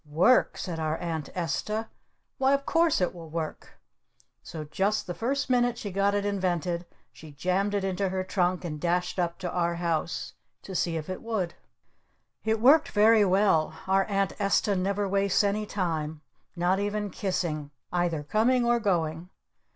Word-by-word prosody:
"Work?" 180 Hz, +12 st, +4 dB
said 170 Hz, -4 st, -4 dB
our 155 Hz, 0 st, -1 dB
Aunt 160 Hz, -4 st, -4 dB
Esta. 210 Hz, +6 st, -2 dB, 0.5 s
"Why 265 Hz, +1 st, +4 dB
of 280 Hz, 0 st, -4 dB
course 330 Hz, -, +2 dB
it 180 Hz, -, +1 dB
will 165 Hz, -2 st, -10 dB
work!" 160 Hz, -1 st, -5 dB, 0.7 s
So 155 Hz, -2 st, -7 dB
just 190 Hz, +8 st, 0 dB
the 175 Hz, -, -4 dB
first 260 Hz, +10 st, -1 dB
minute 245 Hz, -2 st, +2 dB
she 205 Hz, -4 st, -5 dB
got 200 Hz, +2 st, +1 dB
it 205 Hz, 0 st, 0 dB
invented 180 Hz, -3 st, -1 dB, 0.3 s
she 155 Hz, -2 st, -12 dB
jammed 185 Hz, +6 st, 0 dB
it 200 Hz, -, 0 dB
into 195 Hz, 0 st, -1 dB
her 185 Hz, 0 st, -2 dB
trunk 185 Hz, -1 st, 0 dB
and 150 Hz, -3 st, -5 dB
dashed 180 Hz, +1 st, 0 dB
up 170 Hz, -1 st, -1 dB
to 180 Hz, -2 st, -4 dB
our 170 Hz, -1 st, 0 dB
house 160 Hz, -5 st, -2 dB, 0.3 s
to 195 Hz, -, -8 dB
see 170 Hz, -2 st, 0 dB
if 155 Hz, -, -5 dB
it 185 Hz, -, -5 dB
would! 215 Hz, -7 st, -2 dB, 0.9 s
It 220 Hz, 0 st, +1 dB
worked 290 Hz, +7 st, +6 dB
very 215 Hz, +1 st, +5 dB
well. 185 Hz, -5 st, +3 dB
Our 195 Hz, 0 st, +3 dB
Aunt 195 Hz, -2 st, 0 dB
Esta 200 Hz, 0 st, +2 dB
never 200 Hz, +2 st, 0 dB
wastes 195 Hz, +1 st, +2 dB
any 205 Hz, +1 st, 0 dB
time. 160 Hz, -6 st, -2 dB, 0.3 s
Not 180 Hz, +2 st, +1 dB
even 205 Hz, 0 st, -2 dB
kissing. 170 Hz, -7 st, -2 dB, 0.2 s
Either 175 Hz, -4 st, 0 dB
coming 235 Hz, -, +2 dB
or 240 Hz, 0 st, +3 dB
going. 170 Hz, -5 st, -1 dB
185 Hz, 165 wpm, -27 LUFS, 170-205 Hz, 0.9 s, worked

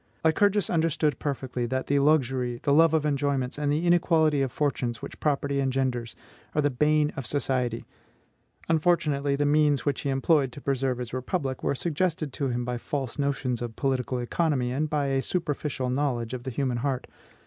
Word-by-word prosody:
Lycurgus 200 Hz, +5 st, +3 dB
understood 160 Hz, -4 st, +1 dB
perfectly 130 Hz, -4 st, -3 dB
that 130 Hz, +2 st, -2 dB
the 140 Hz, 0 st, +2 dB
luxury, 130 Hz, -4 st, +2 dB
the 140 Hz, -, +3 dB
love 160 Hz, +1 st, +5 dB
of 155 Hz, -1 st, +1 dB
enjoyments, 140 Hz, -2 st, 0 dB
and 145 Hz, -1 st, 0 dB
the 155 Hz, +4 st, 0 dB
inequality 160 Hz, -4 st, +3 dB
of 135 Hz, -2 st, 0 dB
fortunes, 125 Hz, -5 st, -1 dB
which -, -, -9 dB
property 140 Hz, -1 st, 0 dB
engenders, 130 Hz, -3 st, -1 dB, 0.4 s
are 150 Hz, -, +3 dB
the 145 Hz, -, +2 dB
bane 150 Hz, +3 st, +2 dB
of 135 Hz, -5 st, -5 dB
society; 125 Hz, -5 st, -1 dB, 0.8 s
unfortunately 150 Hz, -4 st, +2 dB
the 145 Hz, +1 st, 0 dB
means 145 Hz, -1 st, +3 dB
which 145 Hz, -, 0 dB
he 140 Hz, -, -2 dB
employed 135 Hz, 0 st, +2 dB
to -, -, -8 dB
preserve 135 Hz, -2 st, -1 dB
his 125 Hz, -1 st, -6 dB
republic 130 Hz, +1 st, -2 dB
were -, -, 0 dB
suggested 160 Hz, -2 st, -1 dB
to 140 Hz, -, -1 dB
him 120 Hz, -1 st, -2 dB
by 125 Hz, 0 st, -3 dB
false 135 Hz, +1 st, -4 dB
notions 135 Hz, -4 st, -1 dB
of 120 Hz, -2 st, -5 dB
political 130 Hz, -2 st, -1 dB
economy, 125 Hz, 0 st, 0 dB
and 150 Hz, +4 st, -1 dB
by 145 Hz, -1 st, 0 dB
a 135 Hz, -1 st, +1 dB
superficial 145 Hz, -6 st, -2 dB
knowledge 125 Hz, -4 st, -1 dB
of 125 Hz, -1 st, -5 dB
the -, -, -2 dB
human 130 Hz, -1 st, -1 dB
heart. 130 Hz, +1 st, -2 dB
140 Hz, 180 wpm, -27 LUFS, 130-150 Hz, 0.8 s, love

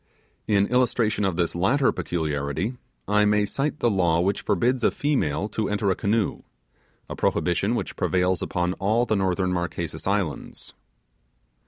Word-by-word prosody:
In 100 Hz, -2 st, +3 dB
illustration 120 Hz, -3 st, +1 dB
of 95 Hz, -3 st, 0 dB
this 85 Hz, -1 st, 0 dB
latter 125 Hz, +11 st, +2 dB
peculiarity, 80 Hz, -, -2 dB, 0.3 s
I 105 Hz, +1 st, +3 dB
may 105 Hz, 0 st, +3 dB
cite 145 Hz, +7 st, -2 dB
the 120 Hz, -, +3 dB
law 85 Hz, -4 st, +2 dB
which 95 Hz, +3 st, 0 dB
forbids 125 Hz, +1 st, +1 dB
a -, -, +5 dB
female 105 Hz, -, 0 dB
to 110 Hz, -2 st, -2 dB
enter 105 Hz, -1 st, +1 dB
a -, -, +1 dB
canoe 105 Hz, 0 st, 0 dB, 0.7 s
a -, -, -6 dB
prohibition -, -, 0 dB
which -, -, -4 dB
prevails 90 Hz, 0 st, +1 dB
upon 90 Hz, 0 st, -1 dB
all 110 Hz, +5 st, +2 dB
the 110 Hz, -, 0 dB
northern 95 Hz, -1 st, 0 dB
Marquesas 85 Hz, -2 st, -4 dB
Islands. 95 Hz, -8 st, -3 dB
100 Hz, 150 wpm, -24 LUFS, 90-110 Hz, 0.7 s, a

